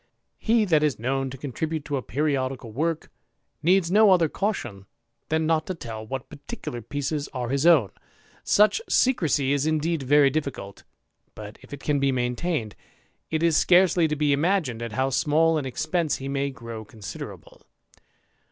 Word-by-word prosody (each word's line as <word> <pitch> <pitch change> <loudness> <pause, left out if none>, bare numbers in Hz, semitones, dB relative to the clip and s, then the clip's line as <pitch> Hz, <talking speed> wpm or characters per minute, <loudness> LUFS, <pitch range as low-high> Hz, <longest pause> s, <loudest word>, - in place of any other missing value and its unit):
He 225 -1 +2
that 160 -6 +3
is 150 -4 +1
known 135 +3 -1
to 135 - -8
contribute 150 +3 -4
to 145 - -2
a 135 - -1
periodical 130 -4 -2
woikd 160 +5 -1 0.5
needs 175 +1 +3
no 215 +1 +6
other 175 -4 +5
caution 120 - -3 0.4
than 160 0 +1
not 160 -1 +1
to 185 - -3
tell 110 -7 -8
what 130 +1 -5
particul^^ 120 -5 -8
pieces 145 +1 -2
are 125 -2 -3
his 140 +4 +1
own; 145 - +5 0.5
such 210 - +3
secrecy 150 - +2
is 145 +1 0
indeed 155 0 0
very 140 +1 +4
difl&cul'rr 130 -10 -4 0.5
but 105 0 -10
if - - -17
it 145 -1 -8
can 145 -2 0
be 135 0 +2
maintained, 125 - -2 0.5
it 160 0 -1
is 165 -2 +3
scarcely 180 -2 +4
to 150 - -2
be 150 -1 +2
imagined 150 - 0
how 130 +3 0
small 160 +3 +2
an 135 - -4
expence 160 +5 -1
he 135 - -6
may 140 0 -1
grow 115 -4 -8
considerable. 105 -2 -10
145 Hz, 160 wpm, -25 LUFS, 130-165 Hz, 0.5 s, no